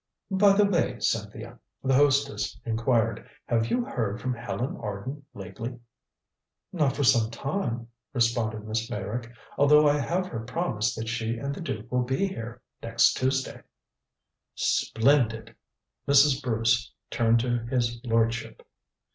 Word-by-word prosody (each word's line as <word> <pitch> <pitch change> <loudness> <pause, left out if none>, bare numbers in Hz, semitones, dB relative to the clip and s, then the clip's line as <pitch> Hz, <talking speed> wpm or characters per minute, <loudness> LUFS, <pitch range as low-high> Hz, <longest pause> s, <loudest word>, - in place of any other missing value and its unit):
"By 195 +1 +5
the 205 +1 +4
way, 200 -2 +1
Cynthia," 110 +2 -3 0.2
the 135 0 +2
hostess 135 -6 +2
inquired, 115 -1 0 0.2
"have 115 -1 +1
you 245 -1 0
heard 115 - -2
from 130 0 -2
Helen 120 +2 -4
Arden 115 +8 -6
lately?" 100 +6 -7 1.0
"Not 150 -6 +1
for 145 - -1
some 120 -4 +4
time," 120 -2 -3 0.2
responded 115 -3 0
Miss 110 +1 -2
Meyrick, 110 +4 -4 0.3
"although 150 +1 +6
I 145 0 +3
have 175 +6 -1
her 120 -11 -5
promise 120 -4 -1
that 110 0 -5
she 115 0 -2
and 140 +4 -3
the - - -7
duke 120 -8 -5
will 125 0 +2
be 130 +9 0
here 120 - -6 0.2
next 115 0 +3
Tuesday." 130 +1 -1 0.9
"Splendid." 115 -2 +1 0.5
Mrs. 140 0 +5
Bruce 115 -1 +1 0.2
turned 115 0 +3
to 120 0 0
his 120 -2 -1
lordship. 115 -1 -1
120 Hz, 135 wpm, -27 LUFS, 115-140 Hz, 1.0 s, although